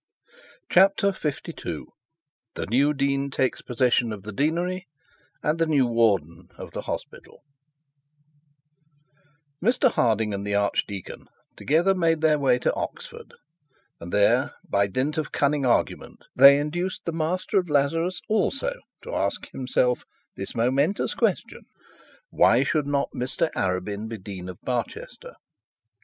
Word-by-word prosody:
CHAPTER 195 +2 +4
LII 150 -3 -4 0.7
THE - - -3
NEW 135 +7 +3
DEAN 140 -1 0
TAKES 130 -1 -1
POSSESSION 120 -1 +1
OF 105 -3 -7
THE 110 - -7
DEANERY 175 - -1 0.6
AND 155 +2 0
THE 165 - +2
NEW 145 -5 +3
WARDEN 100 -8 +1
OF - - -9
THE - - -5
HOSPITAL - - -8 2.2
Mr 250 +3 +3
Harding 110 -2 +1
and 100 0 -3
the 100 0 -1
archdeacon 100 -1 -2 0.3
together 165 +7 +2
made 165 -3 +1
their 155 -2 +3
way 130 -3 +3
to 125 - 0
Oxford, - - -7 0.6
and 85 +1 -8
there, 100 0 +2
by 100 0 +2
dint 135 +10 -1
of 155 - -4
cunning 140 -2 +1
argument, 120 - -1
they 140 +2 +9
induced 175 +6 -3
the 170 - -2
Master 175 +5 0
of 180 -3 -4
Lazarus 165 +5 +1
also 275 - 0 0.3
to - - -7
ask - - -2
himself 125 -1 0 0.3
this 95 - -6
momentous 135 - +1
question: - - -1 0.6
'Why - - +4
should 150 -3 0
not 140 -1 0
Mr 130 +5 -1
Arabin 100 +3 -2
be 115 - -5
Dean 95 -2 -8
of 90 - -9
Barchester?' 485 - -5
140 Hz, 130 wpm, -25 LUFS, 110-165 Hz, 2.2 s, they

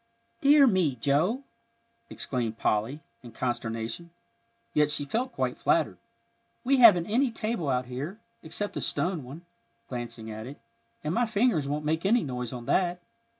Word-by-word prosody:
"Dear 285 0 +7
me, 185 - +2
Joe!" 155 - +1 0.7
exclaimed 115 -4 -3
Polly, 115 +10 0 0.2
in 120 -3 -11
consternation. 120 +6 -3 0.6
Yet 150 -1 +3
she 145 -1 +1
felt 245 - -2
quite - - -2
flattered. - - +1 0.6
"We 270 +2 +3
haven't 210 -9 +8
any 245 +6 +2
table 220 -8 -2
out 125 -1 0
here, 140 - -6 0.2
except 205 +6 -3
the - - -4
stone 175 -5 0
one," 145 +8 -10 0.4
glancing 115 -3 -5
at 110 +2 -7
it, 135 0 -10 0.4
"and 155 +2 -1
my 240 +3 +2
fingers 215 - +1
won't 150 +1 -2
make 160 +2 0
any 220 +3 +3
noise 125 -4 -4
on 120 -2 -7
that. 175 +5 +1
150 Hz, 150 wpm, -28 LUFS, 125-205 Hz, 0.7 s, haven't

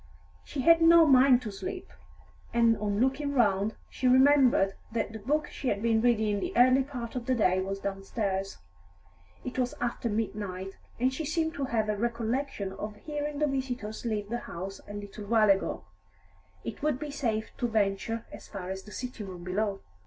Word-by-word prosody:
She 280 - -4
had 335 +4 +6
no 330 0 +8
mind 260 -3 +6
to 215 - -4
sleep, 370 - -6 0.6
and 230 -1 +5
on 205 -1 -1
looking 270 +3 +1
round, 205 -3 +2
she 260 - -2
remembered 260 -6 +5 0.2
that 225 -1 -2
the 220 - -6
book 295 +8 0
she 270 - -5
had 205 -2 0
been 225 -1 +3
reading 220 -3 +2
in 205 - 0
the 355 - -4
early 255 +2 +6
part 255 -4 -6
of 245 -2 -4
the 260 - +2
day 185 -5 +2
was 195 +1 -3
downstairs. 195 0 -3 0.9
It 255 +1 -4
was 250 -1 0
after 240 -1 -2
midnight, 200 -3 -3 0.2
and 255 +2 +2
she 315 - -3
seemed 320 +1 -1
to 280 -5 -2
have 225 -4 0
a 210 - 0
recollection 230 -1 -2
of 210 +2 -6
hearing 295 +4 -4
the 300 - +2
visitors 255 -6 -3
leave 210 -3 -2
the 240 +1 -2
house 195 0 -7
a 205 - -8
little 205 0 -7
while 215 -1 +5
ago; 195 - 0 0.8
it 115 - -6
would 300 -3 +1
be 295 +1 -5
safe 225 -6 -2
to 240 - 0
venture 220 +1 0
as - - -11
far 190 -2 -6
as 190 0 -5
the 210 - -14
sitting 245 -4 -6
room 180 -2 -8
below. 195 +2 -1
230 Hz, 190 wpm, -29 LUFS, 205-265 Hz, 0.9 s, no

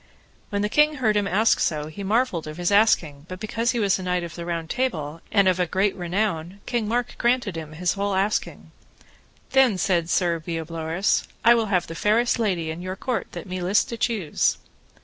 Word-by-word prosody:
When 205 -1 -1
the - - +2
king 300 +7 +3
heard 225 -6 +1
him 205 -1 +1
ask 215 +4 +3
so, 150 -2 0
he 155 +6 -8
marvelled 205 -5 0
of 155 +1 -7
his 175 +2 0
asking, 165 -8 +2
but 185 0 -7
because 225 +3 -1
he 240 - +1
was 200 -3 +2
a - - -5
knight 180 -1 -1
of 170 -1 -7
the 170 0 -7
Round 165 -1 -3
Table, 165 - -2
and 200 -2 +4
of 185 -1 +2
a 180 - +1
great 190 +4 +1
renown, 180 0 -2
King 235 -3 -1
Mark 240 +2 -1
granted 240 -6 +1
him 155 -1 -7
his 175 +3 0
whole 200 0 -1
asking. 200 +3 -1 0.8
Then, 265 -7 +4
said 175 -2 +1
Sir 170 -2 +1
Bleoberis, 165 +2 -1 0.2
I 235 - +8
will 230 -2 +1
have 180 -4 +1
the - - -8
fairest 225 +7 +2
lady 180 -8 0
in 160 +2 -7
your 185 +1 -4
court 250 +4 -3
that - - -6
me 185 -1 -5
list 185 +4 +2
to 235 - -5
choose. 225 -9 0
190 Hz, 205 wpm, -24 LUFS, 170-220 Hz, 0.8 s, I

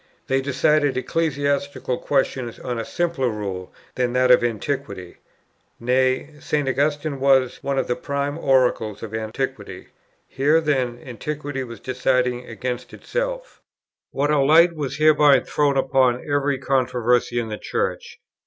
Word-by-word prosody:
They 135 0 +1
decided 140 +1 +2
ecclesiastical 140 -3 -1
questions 130 -4 -1
on 125 -2 -4
a 115 - -3
simpler 170 -7 -1
rule 100 -4 -5 0.2
than 125 -1 -1
that 125 0 +3
of 125 - +6
Antiquity; 110 -5 -3 0.6
nay, 130 +4 +1
St. 145 -1 -1
Augustine 145 +2 0
was 130 -2 +3
one 140 -1 -2
of 135 - +1
the 125 - -1
prime 140 +1 -3
oracles 125 -7 +1
of 110 -1 -7
Antiquity; 110 +5 -5 0.4
here 145 +4 +2
then 130 -6 -1
Antiquity 145 +2 -5
was 115 -4 -9
deciding 125 -1 0
against 125 +2 -5
itself. - - -4 0.5
What 145 +2 0
a 150 - +3
light 160 +5 +5
was 145 -2 -4
hereby 150 -2 +5
thrown 145 -2 0
upon 130 -2 +2
every 145 -1 +1
controversy 125 -2 +1
in 115 -2 -3
the 105 - -5
Church! - - -3
135 Hz, 135 wpm, -22 LUFS, 125-145 Hz, 0.6 s, of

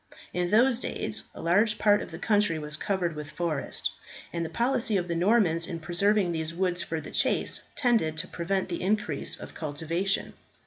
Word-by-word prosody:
In 175 0 0
those 235 +4 +4
days - - -3
a - - -8
large 205 +6 +3
part 205 -1 +4
of - - -7
the 165 - -8
country 205 -3 +2
was 150 0 -1
covered 180 0 -1
with 150 -1 -6
forest, 165 -5 -1 0.4
and 170 -1 -1
the 165 - -4
policy 240 -2 +1
of 175 -1 -2
the 170 - -1
Normans 175 -3 +3
in 170 -3 -4
preserving 180 +3 +2
these 160 0 -2
woods 180 -1 0
for 160 - -3
the - - -9
chase, - - +2
tended 225 - +2
to 175 +3 -1
prevent 190 +2 -2
the 170 - -3
increase 205 +2 0
of - - -9
cultivation. 165 +6 -2
180 Hz, 185 wpm, -28 LUFS, 165-210 Hz, 0.4 s, those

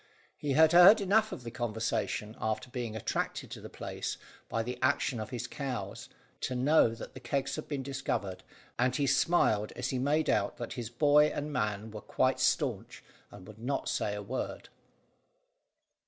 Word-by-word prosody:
He 145 -2 -2
had 160 +3 +6
heard 180 +5 +9
enough 215 +2 +2
of 125 - -7
the 115 - -6
conversation, 110 -2 -2
after 110 +3 -2
being 120 -3 -4
attracted 110 - -3
to - - -7
the - - -9
place - - -5 0.3
by 115 - -1
the 125 +1 -5
action 130 -2 +1
of 110 -1 -5
his 120 -2 -4
cows, 125 -8 -5 0.3
to 130 - -2
know 125 -2 +4
that - - -9
the - - -9
kegs 140 0 -2
had 155 - -6
been 140 -3 -3
discovered, 130 -8 -3 0.4
and 125 +1 +2
he 145 - +1
smiled 110 -8 +2
as 125 +1 -2
he 130 - -1
made 150 +4 +1
out 100 -1 +1
that 120 - -5
his 120 -3 -5
boy 145 +4 +5
and 150 0 -4
man 105 -3 -2
were 105 0 -7
quite - - +1
staunch, - - 0 0.3
and 90 - -13
would 110 0 -12
not 135 +4 -2
say 105 - -1
a 105 - -5
word. - - -5
125 Hz, 180 wpm, -31 LUFS, 110-145 Hz, 0.4 s, heard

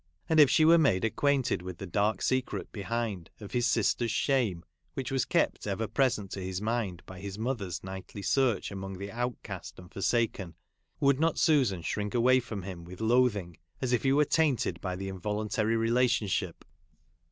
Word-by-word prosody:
And, 160 - +3
if 145 -3 +8
she 155 - +4
were 165 +1 +7
made 115 -10 +3
ac 115 - 0
quainted 140 -7 +1
with 90 -1 -7
the 95 - -6
dark 100 +2 0
secret 130 0 -1
behind, 105 -4 -3
of 105 -2 -9
his 120 -1 +1
sister's 115 +1 +1
shame, 115 - 0 0.3
which 135 - -4
was 135 -2 +1
kept - - 0
ever 105 +3 -1
present 110 -6 0
to 95 - -5
his 95 0 -3
mind 105 -5 -2
by 90 0 -10
his 100 +1 -6
mother's 110 -6 -3
nightly 95 +1 -8
search 130 -6 +1
among 95 -1 -6
the 100 +1 -6
outcast 115 -6 -5
and 90 -1 -13
forsaken, 100 -5 -1 0.4
would 140 -1 +3
not 165 0 +2
Susan 130 - +3
shrink 105 +6 -3
away 130 +2 +5
from 110 -6 -6
him 90 -2 -7
with 90 +2 -11
loathing, 110 -7 +2 0.2
as 130 -2 -1
if 120 - +2
he 135 - +2
were 150 +2 +4
tainted 135 - +1
by 90 -2 -3
the 95 +1 -5
involuntary 105 +3 -1
rela 115 +3 +3
tionship? 105 -7 -1
110 Hz, 185 wpm, -29 LUFS, 95-125 Hz, 0.4 s, if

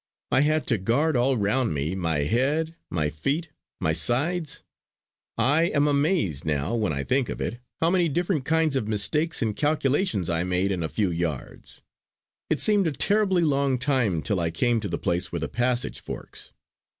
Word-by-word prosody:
I 130 - +4
had 155 +1 +2
to 115 -5 +1
guard 140 +10 +1
all 125 +2 +2
round 110 0 +1
me, 75 +5 -1
my 85 -5 0
head, 145 - 0
my 75 -3 -1
feet, 140 - -2 0.3
my 80 - +1
sides. 145 - 0 0.7
I 150 +5 +3
am 150 -3 +2
amazed, 145 - +1
now 75 +4 -1
when 110 -7 0
I 70 -1 -2
think 130 - 0
of - - -5
it, 120 - -3 0.2
how 165 +1 +3
many 180 -3 +2
different 170 -1 0
kinds 160 -1 +1
of 110 -6 -1
mistakes 150 +9 0
and 110 -2 -1
calculations 145 - +1
I 85 0 0
made 90 +2 0
in 90 -3 -2
a 80 - -2
few 100 -1 0
yards. 85 -6 -5 0.7
It - - +1
seemed 205 -4 +3
a - - 0
terribly 190 - +2
long 140 -3 +2
time 120 - 0
till 100 -3 0
I 85 -1 0
came 115 +8 +1
to 105 -2 -4
the 85 - -2
place 85 +1 -1
where - - -2
the - - -1
passage 120 +1 -1
forks. - - -8
125 Hz, 185 wpm, -25 LUFS, -, 0.7 s, I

